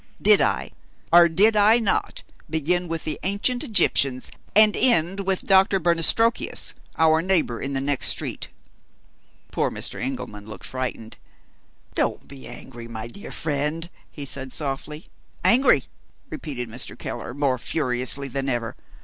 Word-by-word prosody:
Did - - +6
I, - - 0 0.4
or 170 0 +8
did 210 +7 +4
I 210 +2 +5
not, 225 -4 -1 0.3
begin 170 +3 +1
with 165 -1 -3
the 155 - -3
ancient 200 +6 0
Egyptians, 140 - +1 0.2
and 215 0 +6
end 185 -5 +2
with 190 -1 0
Doctor 195 0 +4
Bernastrokius, 175 +7 +1 0.2
our 160 0 +4
neighbor 165 -10 0
in 135 +1 -4
the 135 - -1
next 140 0 -1
street?" - - -1 1.0
Poor - - 0
Mr. - - -4
Engelman 125 -5 -5
looked 110 - -9
frightened. 130 -3 -5 0.8
"Don't - - -2
be 135 -1 -11
angry, 120 -3 -10
my 110 -1 -7
dear 200 - -9
friend," 155 +3 -3 0.2
he 145 - -8
said 135 -1 -3
softly. 150 +3 -3 0.4
"Angry?" 260 +4 +5 0.5
repeated 130 -6 -5
Mr. 115 +3 -6
Keller, 125 - -6
more 140 -3 0
furiously 130 -1 -1
than 135 +1 -2
ever. 120 -3 -2
150 Hz, 140 wpm, -23 LUFS, 130-185 Hz, 1.0 s, or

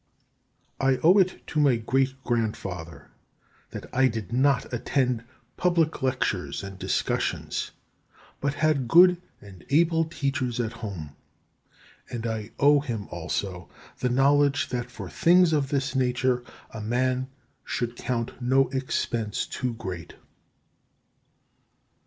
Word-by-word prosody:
4. 135 - +2
I - - -1
owe 180 +5 +7
it 185 -1 +1
to 155 - -2
my 140 -4 +5
great 130 +4 0
grandfather 100 -8 -3 0.6
that - - -7
I 130 +1 +4
did 110 -4 -4
not 135 0 +2
attend 125 -1 0 0.3
public 170 -3 +1
lectures 130 -9 -1
and 100 -1 -8
discussions, - - -1 0.7
but 140 0 -1
had 145 -4 +1
good 180 +5 +6 0.2
and 95 -3 -13
able 165 +2 +3
teachers 135 -6 -2
at 115 -2 -1
home; 90 -10 -7 0.9
and 120 -1 -5
I 110 -2 -3
owe 145 +1 +6
him 115 -8 -5
also 90 -3 -4 0.3
the 125 - 0
knowledge 140 +2 +3
that 125 -1 -3
for - - -8
things 175 -1 +4
of 140 -3 +1
this 140 -2 -1
nature 125 -1 +1 0.3
a 110 - -7
man 130 +3 0 0.4
should 120 0 -3
count 120 0 -3
no 130 +2 +3
expense 115 -5 -2
too 125 -2 -3
great. 90 -7 -7
130 Hz, 125 wpm, -26 LUFS, 115-140 Hz, 0.9 s, owe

